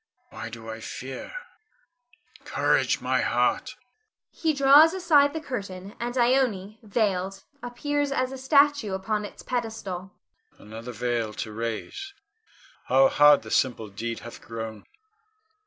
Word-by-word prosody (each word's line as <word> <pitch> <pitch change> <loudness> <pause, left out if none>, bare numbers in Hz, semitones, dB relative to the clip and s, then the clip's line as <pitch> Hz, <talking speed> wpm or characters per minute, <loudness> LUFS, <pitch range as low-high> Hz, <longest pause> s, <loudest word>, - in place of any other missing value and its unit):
Why 110 +1 -7
do 115 -1 -10
I 110 0 -6
fear? 130 +3 -7 1.1
Courage, - - +1
my - - +1
heart! - - 0 0.6
[He 320 -2 0
draws 290 +4 +6
aside 300 -6 +4
the 320 - -4
curtain, 200 -9 -6
and 240 +2 -3
Ione, 235 -5 +1
veiled, 195 -3 -1 0.2
appears 285 +4 -2
as 255 -1 0
a 265 - -6
statue 280 -5 +3
upon 210 +2 -2
its - - -11
pedestal.] 220 -7 -4 0.5
Another 115 +3 -9
veil 120 -2 -2
to 110 - -5
raise! 115 - -5 0.7
How 270 0 +5
hard 145 - +6
the - - -9
simple 120 -5 +1
deed 115 +3 -5
hath 120 - -10
grown. 110 -2 -7
205 Hz, 125 wpm, -26 LUFS, -, 1.1 s, draws